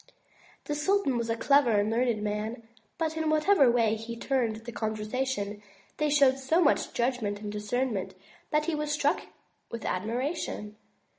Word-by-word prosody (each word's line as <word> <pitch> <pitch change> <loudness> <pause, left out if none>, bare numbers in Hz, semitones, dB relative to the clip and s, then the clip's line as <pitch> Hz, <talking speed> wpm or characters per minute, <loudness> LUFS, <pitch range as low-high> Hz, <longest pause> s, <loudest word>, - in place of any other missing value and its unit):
The 295 - -3
sultan 300 -2 +1
was 235 -1 -2
a 230 - 0
clever 280 0 +4
and 205 +2 +1
learned 230 -2 +1
man, 215 +2 -3 0.3
but 320 -1 -1
in 320 -1 0
whatever 310 -2 +4
way 230 -2 +3
he 225 +1 -5
turned 240 -3 0
the 225 +2 -8
conversation, 215 -1 -3 0.4
they 300 0 +1
showed 275 -2 +4
so 270 +6 +2
much 320 -5 +2
judgment 235 -5 -1
and 210 0 -5
discernment, 210 -2 -2 0.3
that 300 0 +1
he 335 - -1
was 300 -1 -2
struck 290 -1 0 0.4
with 230 - -6
admiration. 225 - -3
245 Hz, 155 wpm, -28 LUFS, 215-290 Hz, 0.4 s, clever